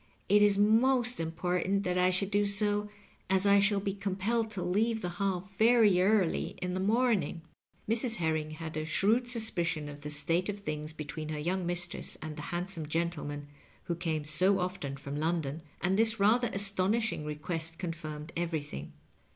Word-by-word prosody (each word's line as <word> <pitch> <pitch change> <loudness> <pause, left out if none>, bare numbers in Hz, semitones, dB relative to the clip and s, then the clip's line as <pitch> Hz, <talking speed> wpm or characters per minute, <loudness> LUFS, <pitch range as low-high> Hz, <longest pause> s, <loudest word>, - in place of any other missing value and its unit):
It 205 +1 +6
is 205 -1 +5
most 240 +4 +3
important 180 +4 -1
that 180 -2 -1
I 180 0 +4
shonld 185 +2 -1
do 205 0 +2
so, 205 +1 +1 0.4
as 190 +1 +2
I 200 0 +6
shiall 200 0 +3
be 195 - -1
com 195 -1 -3
pelled 225 +3 0
to 200 -4 -3
leave 220 +4 +1
the 180 - -1
Hall 195 -3 0 0.2
very 220 -5 +5
early 195 -3 +2
in 180 0 -3
the 185 - -2
morning." 210 -4 +1 0.4
Mrs. 225 +2 +3
Herring 160 -4 -1
had 160 0 -7
a 155 - -1
shrewd 220 +9 +2
suspicion 175 -10 0
of 145 0 -9
the 150 - -5
state 165 +6 0
of 205 0 -3
things 155 -4 -4
between 155 0 -6
her 155 - -3
young 175 +3 -1
mistress 175 0 -2
and 155 -1 -6
the 150 - -7
handsome 175 -2 -3
gentleman 150 -3 -2 0.4
who 175 - -2
came 160 -3 -2
so 180 +6 +3
often 180 -7 -3
from 140 +1 -6
London, 160 -1 -1 0.2
and 190 +4 +1
this 225 -1 +3
rather 230 +4 +4
astonishing 200 -1 0
reqaest 160 +2 -4
confirmed 160 -3 -6
everything. 155 - -4
180 Hz, 175 wpm, -30 LUFS, 160-205 Hz, 0.4 s, It